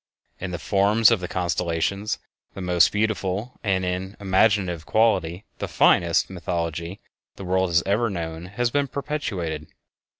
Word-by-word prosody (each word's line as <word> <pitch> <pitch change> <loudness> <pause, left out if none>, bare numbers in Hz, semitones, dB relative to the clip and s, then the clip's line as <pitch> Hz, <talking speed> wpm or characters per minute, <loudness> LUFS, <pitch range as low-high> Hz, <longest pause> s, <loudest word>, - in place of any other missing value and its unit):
In 95 - -4
the 90 - -4
forms 105 +5 +4
of 115 - +3
the 90 - -4
constellations, 90 +2 -1 0.4
the - - -7
most 90 -1 +4
beautiful, 105 +1 -2
and, 95 -3 +1
in 90 +2 -3
imaginative 95 -3 +2
quality, 100 -3 +1
the - - -3
finest, 85 -1 +3
mythology 85 0 -4 0.4
that 100 - -9
the - - -7
world 95 0 +1
has 85 0 +3
ever 110 +4 +1
known 85 -2 -5
has 120 +5 -1
been 145 +1 +1
perpetuated. 95 - -4
95 Hz, 145 wpm, -24 LUFS, 85-105 Hz, 0.4 s, forms